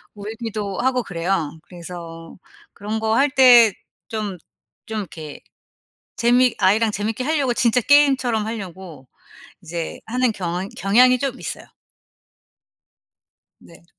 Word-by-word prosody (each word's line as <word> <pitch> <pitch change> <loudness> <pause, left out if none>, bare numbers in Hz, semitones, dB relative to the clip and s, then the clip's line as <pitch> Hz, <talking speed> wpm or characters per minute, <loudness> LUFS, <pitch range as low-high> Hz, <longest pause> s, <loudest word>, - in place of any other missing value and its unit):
울기도 210 -1 -5
하고 250 -1 +1
그래요. 170 -3 -2
그래서 170 -2 -10 0.4
그런 210 +2 -4
거 220 0 0
할 280 +3 +3
때 245 -5 +7 0.4
좀 210 -4 -4 0.5
좀 220 - -4
이렇게 155 -5 -9 0.8
재미 245 +1 +3
아이랑 215 +3 +3
재미있게 215 +4 -3
하려고 280 -4 0
진짜 235 +1 +2
게임처럼 260 -5 +3
하려고 185 - -8 0.5
이제 165 0 -5
하는 250 +2 +1
경잉 180 -1 -4
경향이 250 +6 +4
좀 265 -1 -3
있어요. - - -6 1.9
네. 170 0 -18
215 Hz, 240 characters per minute, -21 LUFS, 180-245 Hz, 1.9 s, 때